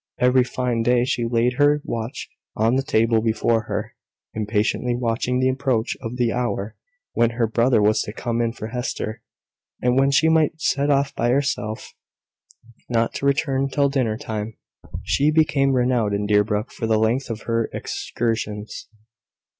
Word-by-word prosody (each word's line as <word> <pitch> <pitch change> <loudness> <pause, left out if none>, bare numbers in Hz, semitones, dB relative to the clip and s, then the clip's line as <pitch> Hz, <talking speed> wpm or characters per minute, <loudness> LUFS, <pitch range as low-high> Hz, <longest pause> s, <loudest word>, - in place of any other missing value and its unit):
Every 125 0 +4
fine 125 -2 -2
day 120 +1 +3
she 120 -2 -1
laid 120 +1 +1
her 145 +1 +4
watch 115 +2 -5 0.3
on 115 +3 +2
the 135 - +2
table 115 -3 +2
before 115 0 +1
her, - - -4 0.4
impatiently 110 +3 0
waiting 120 +1 -1
the 130 - +2
approach 130 -4 0
of 115 -1 -5
the 120 -2 +1
hour 120 -3 -2 0.4
when 120 - +3
her 120 - +3
brother 115 0 +2
was 110 +1 +3
to - - -5
come 120 +2 -2
in 115 -1 0
for 110 -2 -7
Hester, 120 -3 -4 0.6
and 125 +1 +2
when 135 0 +4
she 140 +3 +3
might 160 0 +2
set 145 -1 0
off 140 0 +2
by 120 -2 0
herself, 125 -5 -1 1.0
not 115 -1 +1
to 140 - -2
return 140 -1 +1
till 140 0 +2
dinner 125 -6 0
time. 110 0 -5 0.5
She 145 +2 +2
became 150 -3 +2
renowned 120 -5 +1
in 105 0 -2
Deerbrook 105 +2 +1
for 115 - -4
the 110 -1 +3
length 115 +5 0
of 115 -1 -5
her 115 -1 -1
excursions. 110 -2 -4
120 Hz, 160 wpm, -22 LUFS, 110-135 Hz, 1.0 s, Every